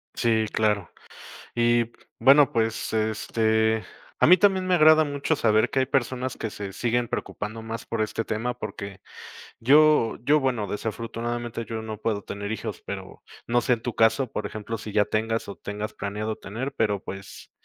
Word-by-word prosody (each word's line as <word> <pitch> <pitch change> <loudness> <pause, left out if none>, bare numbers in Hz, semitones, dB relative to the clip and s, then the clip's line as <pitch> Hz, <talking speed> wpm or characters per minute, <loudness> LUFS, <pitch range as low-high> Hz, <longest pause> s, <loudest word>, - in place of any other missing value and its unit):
Sí, 110 -2 +2
claro. 105 -4 0 0.6
Y, 120 0 +2 0.3
bueno, 140 +4 +6
pues, 115 -3 -1
este 110 0 +1 0.4
a - - +5
mí 180 +3 +8
también 190 0 +3
me 185 0 +3
agrada 155 -1 +7
mucho 145 +1 -1
saber 110 -5 +3
que 135 - 0
hay 130 - +3
personas 130 -1 -1
que 110 - -3
se 100 -1 -6
siguen 120 +2 0
preocupando 110 +2 -4
más 115 0 -6
por 115 - -2
este 110 +1 -1
tema 120 +3 -2
porque 100 -4 -7 0.6
yo 145 -1 +5
yo 150 +4 +4
bueno, 125 -6 -1
desafortunadamente 115 +2 -4
yo 110 0 -4
no 110 -1 -6
puedo 105 -1 -2
tener 100 +1 -5
hijos, 110 - -5
pero, - - -7 0.3
no 120 +1 +2
sé 125 - +2
en 115 - -3
tu 120 -2 -3
caso, 115 +3 +2
por 105 - -3
ejemplo, 110 +1 -5
si 110 0 -7
ya 105 -1 +4
tengas 115 +1 -1
o 100 - -6
tengas 105 +4 -5
planeado 105 +2 -3
tener, 125 +7 -5
pero, 105 -3 0
pues, 100 0 -9
115 Hz, 175 wpm, -25 LUFS, 110-125 Hz, 0.6 s, mí